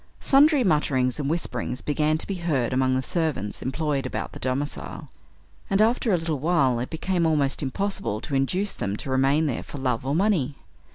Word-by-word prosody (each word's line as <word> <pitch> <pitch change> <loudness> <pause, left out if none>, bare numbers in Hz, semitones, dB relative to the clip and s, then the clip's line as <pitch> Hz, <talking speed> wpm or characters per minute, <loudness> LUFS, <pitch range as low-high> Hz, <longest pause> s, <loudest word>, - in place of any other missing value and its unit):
Sundry 285 0 +5
mutterings 140 - +1
and 140 -1 -1
whisperings 155 -5 -3
began 150 +1 +1
to - - -1
be 200 - -3
heard 135 -8 0
among 130 0 +2
the 130 - 0
servants 150 - -2
employed 140 +1 -1
about - - -4
the - - -9
domicile, 130 - -3 0.6
and, 195 - +2
after 230 +1 +3
a 180 - +4
little 165 -3 -2
while 140 -6 +2
it 125 - -3
became 175 +2 -1
almost 145 -4 +1
impossible 195 - -2
to 150 - -7
induce 180 +10 0
them 100 +1 -3
to 135 - -5
remain 135 +4 +3
there 135 -6 -1
for - - -9
love 125 -4 -1
or 135 +2 -1
money. 170 -8 +1
145 Hz, 185 wpm, -25 LUFS, 130-170 Hz, 0.6 s, Sundry